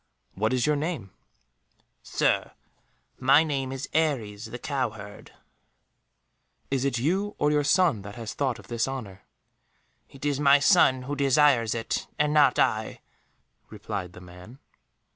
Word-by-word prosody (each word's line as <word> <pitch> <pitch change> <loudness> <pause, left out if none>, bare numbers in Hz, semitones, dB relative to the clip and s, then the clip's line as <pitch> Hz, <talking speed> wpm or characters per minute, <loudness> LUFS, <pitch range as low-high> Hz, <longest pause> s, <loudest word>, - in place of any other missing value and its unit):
"What 110 +3 -1
is 125 -2 +1
your 150 - +2
name?" 145 - -4 0.9
"Sir, - - 0 0.7
my 135 +4 +5
name 135 -4 -3
is 135 +1 -5
Aries 120 -10 -1
the 120 - -7
cowherd." 110 -7 -5 1.4
"Is 135 -2 0
it 135 -3 0
you 190 - -1
or 150 - +1
your 150 0 +2
son 155 - +2
that 100 +1 -10
has 115 -2 -6
thought 130 -5 -1
of - - -15
this 115 0 -1
honour?" 110 -8 -7 0.9
"It 135 +1 -10
is 145 -1 0
my 140 -1 +6
son 130 -2 +4
who 145 +3 -4
desires 135 -4 +3
it, 115 -1 -3
and 150 0 +1
not 145 -4 +4
I," 110 0 0 0.7
replied 90 -2 -6
the 90 - -12
man. 90 +7 -13
130 Hz, 140 wpm, -26 LUFS, 110-145 Hz, 1.4 s, my